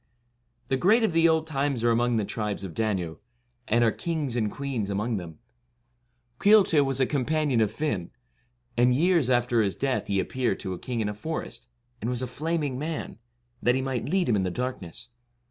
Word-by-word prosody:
The 130 - +1
great 215 - +4
of 215 - +1
the 165 0 +5
old 160 -1 +2
times 140 -5 -1
are 120 - +4
among 120 +1 +2
the 110 - +1
68 - - -7
Tribes 105 -3 -3
of 95 -4 -6
Danu, 95 -7 -1 0.5
and 120 +1 +3
are 115 - +4
kings 155 -6 -3
and 110 -4 0
queens 130 -7 -3
among 105 +3 -1
them. 85 -4 -8 1.0
Caolte 200 -8 +5
was 135 -1 -1
a 130 - +4
companion 145 -2 +1
of 110 - +3
Fiann; 105 - -2 0.7
and 125 +1 +4
years 165 -3 +3
after 120 -2 +3
his 100 -3 0
death 135 -2 -1
he 100 -1 +1
appeared 120 0 -1
to 95 - -4
a 90 - -7
king 120 -3 -3
in 105 - 0
a - - -3
forest, 115 0 -5 0.3
and 115 - -2
was 125 0 -1
a - - 0
flaming 145 +1 -2
man, 155 -6 -4 0.4
that 120 +1 +3
he 130 - 0
might 130 0 -2
lead 185 +1 +1
him 115 - +3
in 100 - +1
the 95 - 0
darkness. 120 -2 -5
125 Hz, 200 wpm, -26 LUFS, 110-150 Hz, 1.0 s, the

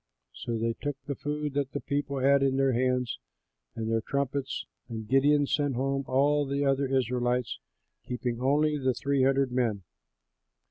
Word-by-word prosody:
So 115 - -4
they 115 +1 0
took 145 +3 -4
the 140 - -2
food 150 +1 -3
that 140 -1 -1
the 145 - -1
people 140 -1 -2
had 140 +1 +4
in 135 -1 +2
their 135 -1 +3
hands, 125 0 0 0.6
and 110 -1 -3
their 115 0 +1
trumpets; 140 +1 -2 0.2
and 110 -2 -6
Gideon 145 +3 +4
sent 145 -1 0
home 135 +2 -1
all 145 +3 +3
the 140 +1 0
other 135 0 +2
Israelites, 125 -1 0 0.5
keeping 125 -1 -3
only 150 +3 +2
the 130 -2 +1
three 140 +1 0
hundred 135 0 +3
men. 115 -6 0
135 Hz, 165 wpm, -28 LUFS, 125-140 Hz, 0.6 s, had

